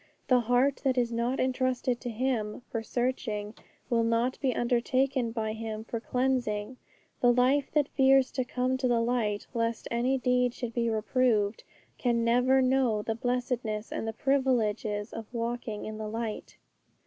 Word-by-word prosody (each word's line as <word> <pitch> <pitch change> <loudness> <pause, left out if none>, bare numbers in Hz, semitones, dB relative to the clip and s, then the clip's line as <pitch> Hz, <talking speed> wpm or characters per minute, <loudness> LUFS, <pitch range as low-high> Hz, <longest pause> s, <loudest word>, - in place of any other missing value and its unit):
The 255 -1 +6
heart 245 +4 +2
that 260 -2 +1
is 240 -1 +1
not 235 +3 -1
entrusted 255 -1 0
to 245 - -4
Him 230 -2 -2
for 230 - -2
searching, 225 -3 -2 0.3
will 235 -2 +2
not 230 +3 +1
be 265 -3 +2
undertaken 255 +1 +1
by 220 -2 -2
Him 220 -1 -5
for 230 0 -4
cleansing; 250 -2 -1 0.4
the 245 - +5
life 260 +3 +3
that 295 -2 +3
fears 270 -1 +4
to 260 - -1
come 255 +1 -1
to 260 -1 0
the 240 -1 +2
light 230 -3 0
lest 230 -1 -1
any 245 +3 +1
deed 250 -1 +1
should 240 -2 -5
be 235 -1 0
reproved, 220 -1 +1 0.4
can 235 -2 +1
never 250 +3 +4
know 255 -5 +2
the 225 - -1
blessedness 240 -2 -2
and 225 - -3
the 225 - -2
privileges 225 -6 0
of 225 0 -7
walking 235 -2 -3
in 215 0 -6
the 215 - -4
light. 225 0 -5
240 Hz, 160 wpm, -29 LUFS, 225-255 Hz, 0.4 s, The